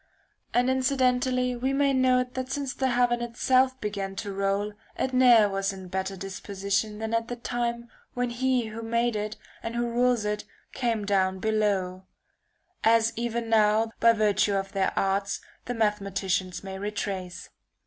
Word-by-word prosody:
And 245 +1 +2
incidentally 255 -1 +1
we 260 +3 -1
may 275 0 +2
note 255 -1 +2
that 260 0 -4
since 275 -1 -2
the 265 - 0
heaven 245 -1 +2
itself 255 +2 +2
began 200 -3 -4
to 200 0 -4
roll 200 +1 -1 0.2
it 260 - -1
ne'er 245 -4 +6
was 195 0 -1
in 190 -1 -9
better 190 +1 -3
disposition 200 +2 -2
than 220 +1 -4
at 230 0 0
the 245 - -4
time 235 0 -3 0.3
when 245 -1 -1
he 255 0 +1
who 220 +1 -7
made 235 +1 0
it 210 0 -3 0.2
and 230 +1 -5
who 240 0 0
rules 240 -1 +2
it 210 0 -2 0.3
came 230 -5 -1
down 190 -2 +1
below; 195 -3 0 0.8
as 225 0 +4
even 235 0 -2
now 220 0 +3
by 230 - +6
virtue 210 -2 +2
of 195 0 -2
their 195 -1 +1
arts 195 +1 0 0.3
the 245 - -3
mathematicians 195 -4 -1
may 190 0 -6
retrace. 195 -3 -4
225 Hz, 160 wpm, -27 LUFS, 200-245 Hz, 0.8 s, ne'er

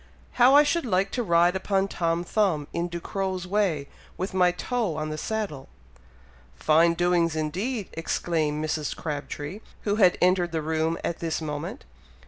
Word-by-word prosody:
"How 255 +3 +8
I 295 - +8
should 335 +3 +1
like 195 -1 +1
to 250 - -1
ride 175 -3 +3
upon 195 0 0
Tom 170 -2 -1
Thumb, 175 -7 0
in 170 +1 -1
Ducrow's 185 +2 -3
way, 180 -7 0 0.3
with 185 +1 -3
my 180 -1 +4
toe 215 -1 -2
on 155 0 -3
the 155 - -3
saddle!" 200 -12 -4 0.9
"Fine 165 +2 +4
doings 175 -2 +2
indeed!" 190 - -2
exclaimed 155 -2 -1
Mrs. 155 -1 -2
Crabtree, 150 +3 -5 0.2
who 205 0 0
had 185 -5 +5
entered 180 -2 +2
the 160 -1 -1
room 160 +1 0
at 170 - -2
this 165 -1 -2
moment. 150 -2 -5
175 Hz, 155 wpm, -26 LUFS, 160-195 Hz, 0.9 s, How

